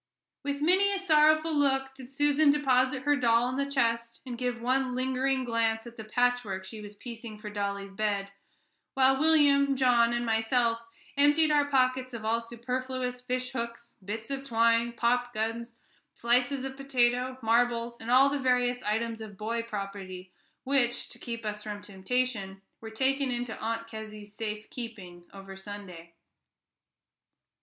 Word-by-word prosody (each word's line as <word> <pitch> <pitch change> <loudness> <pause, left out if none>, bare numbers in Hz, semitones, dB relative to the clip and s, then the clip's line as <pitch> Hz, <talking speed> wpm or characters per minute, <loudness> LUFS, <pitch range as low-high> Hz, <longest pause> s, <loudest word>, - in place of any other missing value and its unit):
With 285 0 -3
many 380 +5 +4
a 400 - 0
sorrowful 310 -3 +4
look 270 -2 +1
did 260 -2 -11
Susan 290 +2 +3
deposit 260 -2 +2
her 290 +1 +3
doll 240 -2 +3
in 255 - -3
the 280 0 -1
chest, 235 -3 0
and 250 -2 -5
give 245 0 -2
one 255 +1 0
lingering 260 +1 0
glance 230 -2 0
at 235 0 -10
the 220 - -8
patchwork 220 -4 0
she 215 +2 -8
was 205 0 -10
piecing 230 -1 -8
for 210 0 -8
dolly's 200 -1 -3
bed, 200 -1 -2 0.6
while 265 0 +4
William, 285 -3 +4
John, 245 -3 +4
and 240 0 -1
myself 230 +1 +1 0.4
emptied 295 +2 +4
our 290 -1 +3
pockets 255 -2 +1
of 220 -2 -7
all 230 +1 +1
superfluous 250 +2 -4
fish 255 0 -3
hooks, 235 -1 -6
bits 220 +6 -6
of 275 0 -3
twine, 230 -1 +2
popguns, 235 -1 -1 0.4
slices 250 +3 +1
of 265 0 -5
potato, 255 -2 +1
marbles, 235 +1 +1
and 225 - -7
all 260 +3 +6
the 285 0 -2
various 250 -1 +1
items 225 +1 -2
of 210 -3 -9
boy 230 +3 -2
property, 195 -4 -7 0.3
which, 260 -3 +1
to - - -12
keep 230 -1 -6
us 210 0 -3
from 210 -1 -6
temptation, 200 0 -3 0.2
were 225 - -8
taken 265 +4 0
into 245 -2 -3
Aunt 230 +1 -3
Kezzy's 215 -2 -9
safe 215 0 -5
keeping 195 -8 -8
over 195 0 -10
Sunday. 190 -4 -10
240 Hz, 155 wpm, -29 LUFS, 220-260 Hz, 0.6 s, all